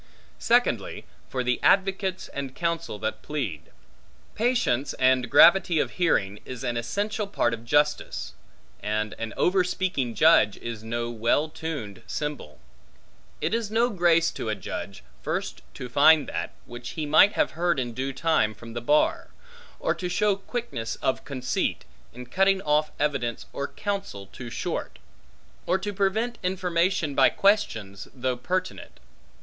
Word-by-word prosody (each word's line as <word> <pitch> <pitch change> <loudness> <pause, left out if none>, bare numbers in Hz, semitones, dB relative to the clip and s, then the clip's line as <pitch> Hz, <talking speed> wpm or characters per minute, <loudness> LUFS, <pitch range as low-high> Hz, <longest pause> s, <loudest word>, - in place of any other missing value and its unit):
Secondly, - - +1 0.2
for 130 -1 -2
the 125 0 0
advocates 190 -1 +2
and 135 -2 -6
counsel 170 -9 -2
that 110 +1 -3
plead. 105 - -4 0.6
Patience 215 - +1
and 130 -2 +2
gravity 175 +3 +6
of - - +1
hearing, 105 - +1
is 130 0 -8
an 120 -2 -1
essential 205 - -2
part 120 -11 0
of 115 0 -6
justice; 145 +4 0 0.5
and 105 0 -2
an 115 -1 -4
overspeaking 180 -9 +1
judge 155 -10 +5
is 115 -2 -6
no 120 +1 -3
well 120 +7 +1
tuned 145 - -6
cymbal. 150 - -5 0.8
It - - 0
is 230 -2 -1
no 230 +3 +2
grace 170 -3 +3
to 110 - -5
a 110 - 0
judge, 100 +1 -7 0.2
first - - -3
to 125 - -6
find 145 +4 +5
that, 85 -1 -4
which 120 +4 -9
he 155 - -1
might 155 +7 +6
have - - +1
heard 170 -2 0
in 120 -2 -3
due 130 +3 -3
time 135 -7 +1
from 115 +2 -11
the 120 - -4
bar; 145 +5 +2 0.5
or - - +1
to 180 - -4
show 205 +2 +2
quickness 195 - -5
of 130 - -2
conceit, 130 -3 -2 0.3
in 125 +1 -9
cutting 195 +8 +2
off 150 0 +2
evidence 135 -6 -1
or 140 - -3
counsel 200 - -4
too 120 +5 -9
short; 115 - -4 0.7
or 185 - +3
to 205 +2 -4
prevent 215 +5 0
information 180 -3 0
by - - +5
questions, 115 - 0
though 130 0 -1
pertinent. 185 +9 -4
145 Hz, 145 wpm, -26 LUFS, 120-185 Hz, 0.8 s, gravity